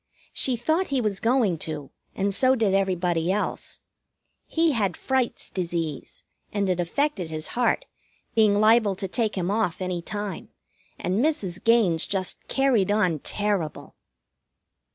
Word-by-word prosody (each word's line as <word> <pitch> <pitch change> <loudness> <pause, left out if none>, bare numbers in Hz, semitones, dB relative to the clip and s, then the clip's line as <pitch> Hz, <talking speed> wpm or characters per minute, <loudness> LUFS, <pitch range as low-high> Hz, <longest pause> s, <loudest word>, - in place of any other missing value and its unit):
She 260 - +3
thought 315 +10 0
he 275 -2 0
was 210 -5 -1
going 225 -8 +2
to, 150 -4 -5 0.2
and 200 +1 0
so 260 +5 +4
did 220 -5 +1
everybody 180 -3 +1
else. 210 +2 -3 0.7
He 330 0 +2
had 200 - 0
Fright's 260 -2 -1
disease, 170 -5 -4 0.3
and 200 -1 0
it 180 -1 0
affected 190 - -1
his 155 0 -4
heart, 245 0 +1 0.5
being 210 -2 +4
liable 215 -2 +4
to 195 +1 -4
take 220 +2 -1
him 180 +1 -1
off 210 -5 0
any 180 -2 -2
time, 205 0 -5 0.5
and 190 +7 0
Mrs. 195 - -1
Gaines 220 -8 +3
just 190 -2 -1
carried 260 -8 +2
on 185 -7 +2
terrible. 200 -3 -2
200 Hz, 140 wpm, -25 LUFS, 180-230 Hz, 0.7 s, so